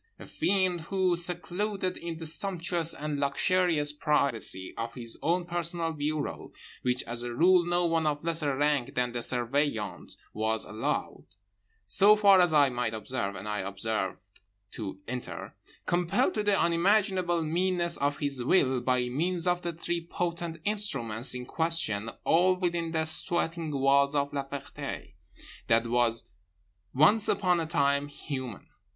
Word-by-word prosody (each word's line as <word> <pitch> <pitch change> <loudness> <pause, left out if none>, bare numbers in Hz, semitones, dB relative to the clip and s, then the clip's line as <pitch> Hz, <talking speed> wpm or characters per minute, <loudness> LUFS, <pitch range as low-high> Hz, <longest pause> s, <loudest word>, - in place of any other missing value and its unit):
A - - -11
fiend 185 -3 0
who, 185 +1 +1
secluded 185 +2 -2
in 170 -1 -6
the 165 - -7
sumptuous 170 0 0
and 150 -1 -3
luxurious 150 +1 +1
privacy 140 - -1
of 115 0 -5
his 115 -3 -5
own 175 +3 +1
personal 170 -1 -2
bureau 150 0 -3 0.3
(which 125 0 0
as 120 0 -3
a 120 0 -4
rule 180 +5 +5
no 175 0 +1
one 165 -2 +1
of 150 0 -1
lesser 160 -5 +1
rank 145 -3 0
than 125 0 0
the 120 - -3
Surveillant 120 -2 -1 0.2
was 110 +1 0
allowed, 110 +2 -3 0.6
so 200 - +6
far 200 -3 +6
as 175 -2 +3
I 145 -3 +4
might 120 -2 -2
observe—and 105 -4 -4
I 105 0 -2
observed—to 100 0 -5
enter) 125 0 -6 0.3
compelled 175 +8 +1
to 215 - -1
the 205 -1 +2
unimaginable 180 0 +2
meanness 170 +1 0
of 140 0 0
his 140 -4 -2
will 130 -3 +3
by 125 0 +1
means 170 +7 0
of 180 0 +2
the 175 - -2
three 170 +1 -3
potent 170 -1 -4
instruments 125 - -1
in 125 0 -5
question 135 -10 +1
all 180 +3 +4
within 170 -2 -2
the 160 -1 0
sweating 165 +1 -1
walls 140 0 +3
of 140 0 0
La 140 -1 -2
Ferté—that 125 -4 -4
was 115 -1 +1 0.7
once 180 - +4
upon 185 -3 +2
a 165 - -2
time 140 -2 +1
human. 130 - -6
155 Hz, 145 wpm, -29 LUFS, 125-175 Hz, 0.7 s, so